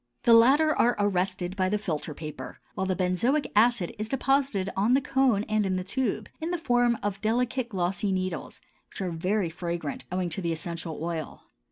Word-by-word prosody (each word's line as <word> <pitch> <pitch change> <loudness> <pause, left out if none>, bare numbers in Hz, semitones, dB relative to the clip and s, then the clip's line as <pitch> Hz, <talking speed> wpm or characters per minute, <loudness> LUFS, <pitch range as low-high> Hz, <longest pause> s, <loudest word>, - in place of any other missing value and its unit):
The 235 - +6
latter 280 +7 +6
are 240 +1 +3
arrested 185 -2 0
by 185 -1 +1
the 210 - +1
filter 160 -6 -4
paper, 155 -2 -8
while 190 - -2
the 185 - +1
benzoic 195 - +1
acid 220 -4 +3
is 215 +1 -2
deposited 270 -7 +1
on 215 +6 +3
the - - +5
cone 265 -6 +2
and 215 -1 0
in 190 -1 0
the 185 - -2
tube, 215 0 -2
in 325 +1 -3
the 350 - 0
form 245 -6 +2
of 200 -1 -2
delicate 240 +3 0
glossy 195 0 -1
needles 185 -3 -3 0.3
which - - -11
are 185 -2 -2
very 180 +2 0
fragrant 170 -4 -4
owing 180 -1 -1
to 170 +4 -4
the 170 -2 -1
essential 165 0 -5
oil. 165 -2 -4
195 Hz, 190 wpm, -27 LUFS, 180-240 Hz, 0.3 s, The